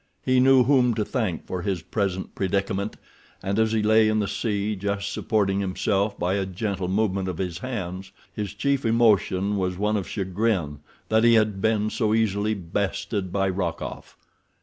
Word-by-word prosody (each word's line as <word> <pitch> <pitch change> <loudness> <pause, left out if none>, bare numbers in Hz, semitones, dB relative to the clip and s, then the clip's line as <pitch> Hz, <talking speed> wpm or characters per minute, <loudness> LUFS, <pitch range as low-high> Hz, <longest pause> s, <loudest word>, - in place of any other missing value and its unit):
He 130 0 +3
knew 130 0 +6
whom 125 -3 +3
to 105 -1 -1
thank 110 - -2
for 90 - -4
his 95 -3 -2
present 95 0 -2
predicament, 100 +1 -1 0.5
and 100 +3 -1
as 110 0 +3
he 110 -1 +1
lay 110 0 +5
in 110 - +1
the 105 -2 0
sea, 105 -1 -1
just 100 0 -3
supporting 100 -3 0
himself 100 +1 0
by 90 +2 0
a 100 -1 0
gentle 95 -1 -3
movement 95 -1 0
of 90 - -4
his 90 -2 -3
hands, 95 -6 -5 0.2
his 105 -1 -4
chief 140 +5 0
emotion 105 -4 +2
was 90 -1 -1
one 105 +2 +1
of 95 - -4
chagrin 95 -6 -1 0.3
that 110 0 +3
he 115 0 +6
had 105 -3 +2
been 110 0 +1
so 110 -2 +1
easily 110 -1 +1
bested 100 +1 -3
by 95 0 +1
Rokoff. 90 -3 -4
100 Hz, 170 wpm, -25 LUFS, 95-110 Hz, 0.5 s, knew